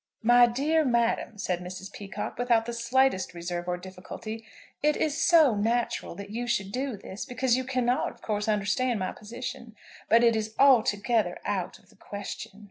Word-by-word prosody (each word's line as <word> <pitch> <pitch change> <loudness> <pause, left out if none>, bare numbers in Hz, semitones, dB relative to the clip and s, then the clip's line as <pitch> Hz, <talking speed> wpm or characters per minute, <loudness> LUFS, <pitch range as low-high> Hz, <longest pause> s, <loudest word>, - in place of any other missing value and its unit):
"My 240 +1 +7
dear 295 +7 +1
madam," 235 -3 +1
said 180 -3 -1
Mrs. 185 +2 -8
Peacocke, 200 +3 -6
without 235 -2 +3
the 235 - -4
slightest 235 -6 +1
reserve 175 +1 -4
or 180 0 -1
difficulty, 190 +5 -8 0.4
"it 300 0 +2
is 300 -2 0
so 315 -8 +5
natural 225 -1 -1
that 200 +1 -8
you 240 +2 -3
should 195 -4 -1
do 255 -1 -3
this, 195 +1 -7
because 250 -2 +1
you 260 - -1
cannot 255 -1 0
of - - -16
course 210 -1 -2
understand 215 +4 +1
my 185 -2 -2
position; 240 +1 -8 0.3
but 230 +1 +6
it 230 -1 +5
is 220 0 -3
altogether 225 -6 +3
out 195 -4 -2
of - - -25
the - - -22
question." 200 0 -7
230 Hz, 175 wpm, -27 LUFS, 200-250 Hz, 0.4 s, My